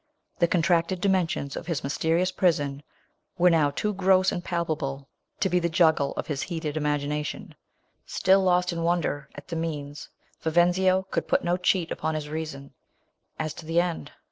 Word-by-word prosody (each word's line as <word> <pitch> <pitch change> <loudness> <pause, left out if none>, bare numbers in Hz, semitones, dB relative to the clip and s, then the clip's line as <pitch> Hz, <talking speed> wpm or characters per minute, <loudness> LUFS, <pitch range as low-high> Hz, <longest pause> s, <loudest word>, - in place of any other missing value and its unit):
The 170 - +4
contracted 175 +1 +1
dimensions 175 -7 0
of - - -6
his 165 -5 -2
my - - -2
te 160 +2 -2
rious 180 +3 +2
prison 145 -6 +1 0.6
were 180 0 +5
now 155 -3 +3
too 210 +9 -2
»TO 190 -1 +4
;m,i - - -2
palpable 155 -6 -3 0.3
to 195 - +2
be 180 -1 +2
the 170 -1 0
juggle 160 -4 +3
of' - - -4
his 145 -3 -3
lieat 165 -2 -5
ed 150 0 -2
imagination. 150 0 -2 0.5
Stilllost 185 -2 +3
in 170 - -3
wonder 165 -4 -1
at 145 - -11
the 170 - -3
means, 150 -3 -4 0.3
Viven/io 180 +3 +3
could - - -1
put - - +2
no 175 +1 +1
cheat 180 -1 +1
upon 160 0 -2
his 150 -1 -4
reason, 150 -3 -6 0.6
as 155 -1 -3
to 165 - -11
the 165 +1 +2
end. 170 -4 -2
165 Hz, 175 wpm, -26 LUFS, 150-180 Hz, 0.6 s, were